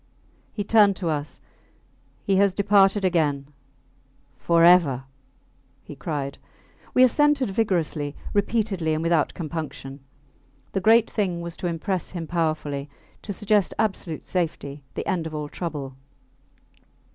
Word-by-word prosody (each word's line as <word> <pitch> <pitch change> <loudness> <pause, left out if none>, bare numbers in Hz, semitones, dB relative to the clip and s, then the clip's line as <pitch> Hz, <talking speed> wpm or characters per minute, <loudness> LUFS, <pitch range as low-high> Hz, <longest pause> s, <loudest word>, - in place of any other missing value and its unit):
He 205 - -3
turned 205 -1 +5
to 175 -2 -3
us. 150 -1 -3 0.8
He 195 -1 +2
has 200 -1 +3
departed 200 -1 +4
again 150 -5 0 0.8
forever! 170 -6 +4 0.8
he 150 - -10
cried. 140 -3 -4 0.6
We 255 - +7
assented 280 -2 +3
vigorously, 165 -8 -1 0.2
repeatedly, 200 -6 0
and 155 - -2
without 165 -2 +1
compunction. 155 -4 -6 0.7
The 195 - -1
great 225 +3 +5
thing 185 -5 -2
was 170 0 -6
to 180 - -3
impress 175 +2 -2
him 170 -3 -5
powerfully; 155 -4 -2 0.3
to 205 - -6
suggest 210 0 +1
absolute 195 -7 -2
safety 150 -5 -3
the - - -4
end 175 -5 -1
of 155 - -7
all 150 -1 -3
trouble. 145 -5 -5
170 Hz, 120 wpm, -24 LUFS, 155-200 Hz, 0.8 s, We